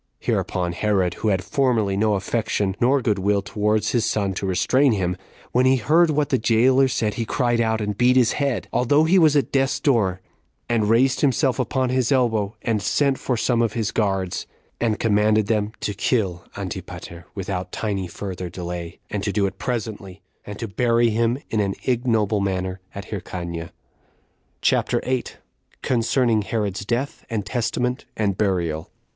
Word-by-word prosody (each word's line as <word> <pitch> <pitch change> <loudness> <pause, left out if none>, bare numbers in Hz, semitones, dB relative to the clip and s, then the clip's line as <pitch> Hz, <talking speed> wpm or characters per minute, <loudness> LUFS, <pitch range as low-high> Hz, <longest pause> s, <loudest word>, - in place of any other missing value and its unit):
Hereupon 90 -1 -1
Herod, 95 -1 +1
who - - 0
had 95 -3 +1
formerly 115 -6 +1
no 105 +1 +2
affection 100 -1 -1
nor 130 +2 +3
good 105 -3 +1
will 100 +1 +1
towards 105 +1 0
his 120 -3 +1
son 105 -4 0
to 95 - -3
restrain 115 +9 +3
him, 90 -3 -1 0.4
when 125 +1 +3
he 130 - +5
heard 160 +7 +3
what 150 -1 +1
the 130 - +2
jailer 125 +4 +4
said, 110 -4 -1
he 115 - -2
cried 120 0 +1
out, 110 -1 0
and 105 -1 -2
beat 125 +1 +4
his 125 -3 +4
head, 140 -4 -1
although 145 +5 +3
he 180 +4 +4
was 155 -3 +5
at 140 -5 +1
death's 135 +1 +1
door, 110 - +2 0.5
and 110 -3 +1
raised 125 +3 +3
himself 135 -2 +2
upon 130 +1 0
his 130 0 +1
elbow, 110 -6 +1
and 110 -3 0
sent 140 +5 +1
for 125 - -1
some 120 +1 +1
of 115 -3 0
his 110 -3 -1
guards, 95 -4 -1 0.3
and 110 -2 +1
commanded 105 -1 +3
them 105 0 0
to 105 - -2
kill 95 -5 -1
Antipater 90 -3 -7
without 95 -2 -4
tiny 100 -4 -2
further 90 0 -6
delay, 85 0 -6
and 105 - -2
to 100 - -1
do 100 0 +1
it 95 - -4
presently, 105 -6 -4 0.2
and 105 -1 -6
to 115 - -4
bury 115 +3 +2
him 115 +2 +1
in 110 - +1
an 100 -2 0
ignoble 115 -4 +1
manner 95 -1 -2 0.2
at 100 - -8
Hyrcania. 85 -4 -5 0.9
CHAPTER - - +2
8. 130 -1 -2 0.5
Concerning 120 -2 +2
Herod's 105 -2 -2
Death, 125 +6 -2
And 110 -4 -2
Testament, 125 +4 -1
And 100 -3 +1
Burial. 85 -6 -1
110 Hz, 170 wpm, -22 LUFS, 100-125 Hz, 0.9 s, he